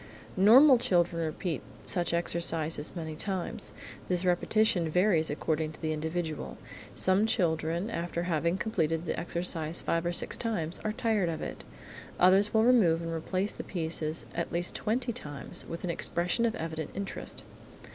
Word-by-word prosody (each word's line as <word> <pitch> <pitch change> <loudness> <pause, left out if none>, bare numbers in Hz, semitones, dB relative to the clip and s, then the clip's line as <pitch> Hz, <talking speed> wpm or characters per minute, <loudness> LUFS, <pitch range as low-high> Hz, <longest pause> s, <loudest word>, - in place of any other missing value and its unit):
Normal 245 +7 +7
children 175 -6 +2
repeat 160 0 -3 0.2
such 175 -1 +1
exercises 165 -2 0
many 160 -2 -5
times. 190 +1 -3 0.4
This 180 0 0
repetition 180 -1 +2
varies 180 -1 +3
according 155 +1 -1
to - - -14
the 155 -1 -1
individual. 160 0 -3 0.4
Some 190 +3 +3
children 170 -2 0
after 170 -2 -3
having 170 +1 0
completed 165 -6 -1
the - - -2
exercise 170 -1 -2
five 165 0 0
or 175 - 0
six 175 - 0
times 180 -8 -2
are 215 - 0
tired 220 -6 +1
of 160 - -4
it. - - -6 0.6
Others 190 +3 +5
will 220 0 +4
remove 195 -10 +4
and 165 0 -3
replace 185 +5 -1
the - - -7
pieces 160 -2 -3
at 170 - -3
least 175 +1 -1
twenty 240 +2 -1
times, 145 - -6
with 165 - -6
an 180 - 0
expression 175 +8 0
of 225 - -2
evident 160 -1 -4
interest. 200 0 -6
170 Hz, 155 wpm, -30 LUFS, 160-200 Hz, 0.6 s, Normal